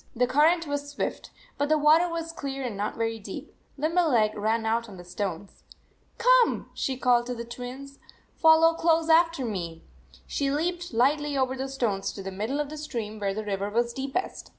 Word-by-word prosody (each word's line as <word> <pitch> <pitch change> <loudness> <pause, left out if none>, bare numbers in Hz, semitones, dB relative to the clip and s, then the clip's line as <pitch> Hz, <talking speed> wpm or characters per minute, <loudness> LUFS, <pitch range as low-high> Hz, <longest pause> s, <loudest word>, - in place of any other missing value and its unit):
The 250 +1 +3
current 315 +6 +3
was 285 -1 -3
swift, 290 - -4 0.3
but 290 +1 +1
the 310 - +4
water 310 +4 +5
was 330 -1 -4
clear 275 -4 -5
and 240 -5 -3
not 205 +2 -3
very 225 0 -1
deep. 205 - -8 0.2
Limberleg 295 -9 +2
ran 220 +2 0
out 230 +1 0
on 195 - -11
the 175 - -10
stones. 185 +1 -5 0.6
"Come," - - +3
she 265 -1 -2
called 245 -1 +3
to 250 - -3
the 235 0 -6
Twins. 255 +4 -8 0.2
" - - -35
Fol 320 0 +7
low 330 0 +6
close 330 0 +2
after 330 -4 +4
me." 170 -7 -5 0.4
She 280 - -1
leaped 345 +4 -2
lightly 285 +4 +1
over 260 -1 +1
the 265 +1 -4
stones 225 -8 -1
to 195 - -8
the 195 - -5
middle 220 +9 -3
of 295 -1 -2
the 310 - -6
stream, 225 -8 -5
where 195 -1 -1
the 215 0 -4
river 200 0 -2
was 235 +2 0
deepest. 270 +8 -4
265 Hz, 195 wpm, -27 LUFS, 220-310 Hz, 0.6 s, Fol